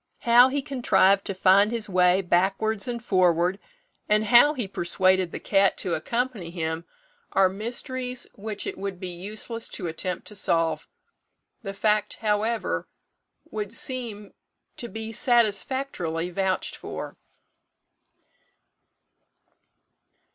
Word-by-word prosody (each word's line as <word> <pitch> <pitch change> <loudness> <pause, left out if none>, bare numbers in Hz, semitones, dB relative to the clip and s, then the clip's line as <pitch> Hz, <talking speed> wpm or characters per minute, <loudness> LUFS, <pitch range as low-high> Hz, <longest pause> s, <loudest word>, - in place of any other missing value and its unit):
How 240 +2 +6
he 280 +1 -2
contrived 200 -7 +2
to 195 - -4
find 195 +2 +4
his 230 -2 -3
way 180 0 +3
backwards 195 +5 0
and 240 -1 -4
forward, 180 0 +2 0.5
and 215 +1 +3
how 245 +7 +6
he 240 -7 -3
persuaded 185 0 +1
the - - -6
cat 195 -1 +2
to 180 - -1
accompany 230 +1 -2
him, 165 -1 -4 0.5
are 195 -1 +5
mysteries 245 +5 -2
which 210 0 -6
it - - -5
would 195 -2 -5
be 185 - -5
useless 210 +6 -6
to 185 - -5
attempt 170 +2 -4
to 210 - -9
solve. 165 -4 0 0.7
The 195 -4 -6
fact, 210 +1 0
however, 220 +1 -1 0.6
would 210 -2 -4
seem 230 -4 +1 0.4
to 240 - -6
be 220 0 -6
satisfactorily 220 -7 0
vouched 190 +1 -1
for. - - -7
205 Hz, 120 wpm, -25 LUFS, 185-230 Hz, 0.7 s, How